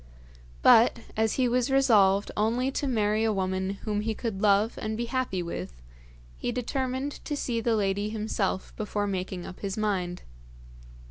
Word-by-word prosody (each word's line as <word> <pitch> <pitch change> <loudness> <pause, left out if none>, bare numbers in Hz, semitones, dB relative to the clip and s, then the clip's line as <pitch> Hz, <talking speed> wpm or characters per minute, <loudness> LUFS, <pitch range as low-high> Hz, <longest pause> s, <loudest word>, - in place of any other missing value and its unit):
But, - - +7 0.2
as 220 0 +1
he 255 -2 +2
was 245 +1 +1
resolved 210 -8 +4
only 235 +5 +1
to 280 - -2
marry 215 -3 +1
a 225 - +2
woman 190 -1 -1
whom 210 -1 -1
he 220 0 -2
could 215 -5 -4
love 210 +1 +3
and 215 0 -3
be 235 - -1
happy 240 -8 -1
with, 90 - -6 0.6
he - - -3
determined 260 +3 -3
to 295 - -3
see 235 -4 -1
the 230 0 +1
lady 205 0 0
himself 210 -3 -2
before 210 -1 -2
making 185 -2 -3
up 185 - -9
his 200 0 -4
mind. 185 -4 -1
215 Hz, 160 wpm, -27 LUFS, 195-240 Hz, 0.6 s, But